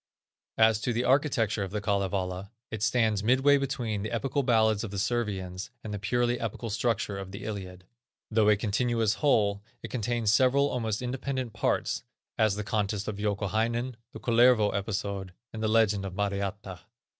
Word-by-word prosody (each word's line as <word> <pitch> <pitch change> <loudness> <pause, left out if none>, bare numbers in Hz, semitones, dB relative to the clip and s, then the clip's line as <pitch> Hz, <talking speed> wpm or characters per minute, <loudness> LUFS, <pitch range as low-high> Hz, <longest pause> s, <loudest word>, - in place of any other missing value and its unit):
As 110 -1 +4
to 120 - 0
the 120 +2 0
architecture 125 -6 +2
of 95 - -2
the 105 +3 -3
Kalevala, 100 -2 -1 0.2
it 110 -2 -5
stands 110 -2 +2
midway 130 +6 +4
between 125 -6 -2
the 110 - -3
epical 135 +4 -1
ballads 110 -4 +3
of 110 - -4
the 100 - -6
Servians 95 -4 -2
and 105 - -5
the 105 - -3
purely 120 +4 0
epical 115 0 -4
structure 110 -2 -1
of 95 -1 -7
the 100 - -8
Iliad. 95 -4 -6 0.5
Though 110 -1 +4
a 105 - +6
continuous 115 +1 +1
whole, 105 -8 +3 0.2
it - - -7
contains 120 -2 0
several 135 +5 +4
almost 110 -2 -2
independent 130 -1 -3
parts, - - 0 0.3
as 110 -3 +2
the 105 - -3
contest 105 -1 -1
of 105 - -3
Youkahainen, 110 +4 -1 0.2
the - - -9
Kullervo 120 -2 +4
episode, 100 -2 -3 0.2
and 110 - -5
the 110 - +1
legend 105 -3 +3
of 95 -2 -6
Mariatta. 100 -2 -3
110 Hz, 165 wpm, -28 LUFS, 100-120 Hz, 0.5 s, a